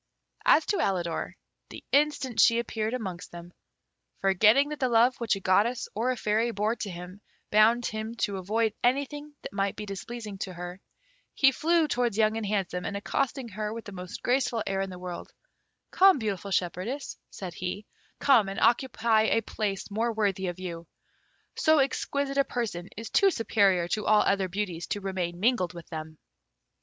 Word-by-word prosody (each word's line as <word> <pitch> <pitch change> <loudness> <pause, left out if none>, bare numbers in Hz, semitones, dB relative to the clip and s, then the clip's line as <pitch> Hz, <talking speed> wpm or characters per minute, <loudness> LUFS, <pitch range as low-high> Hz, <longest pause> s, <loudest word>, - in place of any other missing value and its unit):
As 310 - +6
to 410 - 0
Alidor, 175 -4 -1 0.3
the - - -10
instant 280 -4 +1
she 230 - +6
appeared 225 0 -2
amongst 190 -7 -6
them, 175 0 -10 0.7
forgetting 215 +9 +4
that 300 - -5
the 260 -3 +1
love 240 +2 +4
which 230 -3 +1
a - - -5
goddess 210 +7 +2
or 230 +5 0
a 255 - 0
fairy 220 +2 +1
bore 215 +1 0
to 205 - -4
him 180 +3 -9 0.3
bound 225 +3 +5
him 220 +1 -4
to 200 -4 -1
avoid 215 +4 0
anything 285 +4 -1
that - - -7
might 195 -1 -1
be 210 - -6
displeasing 210 +1 -7
to 185 - -4
her, 180 +2 -7 0.5
he 270 -1 +5
flew 330 +3 +2
towards 240 -6 0
Young 215 0 +3
and 225 -2 -3
Handsome, 190 -3 -1
and 200 - -3
accosting 255 +4 -2
her 210 +1 -4
with 230 +1 -7
the 205 - -8
most 180 -1 -8
graceful 245 -3 +1
air 195 0 -1
in 195 - -3
the 180 - -8
world: 180 -1 -7 0.6
"Come, 385 -3 +6
beautiful 205 -4 -3
shepherdess," 190 +9 -2
said 185 -3 -7
he, 185 +3 -5 0.3
"come 235 -8 +4
and 195 - -4
occupy 230 -2 +3
a 225 - +2
place 205 -2 -3
more 225 +3 0
worthy 200 -4 0
of 175 0 -4
you. 170 -3 -7 0.7
So 315 0 +4
exquisite 275 0 0
a - - +6
person 210 -9 -4
is 225 +1 -7
too 395 - +5
superior 200 - +2
to 210 +3 -2
all 215 -1 +5
other 195 -1 +1
beauties 180 -3 -3
to 205 - -2
remain 185 -3 -3
mingled 200 -5 +1
with 170 - -10
them." 155 -1 -7
215 Hz, 180 wpm, -28 LUFS, 190-240 Hz, 0.7 s, As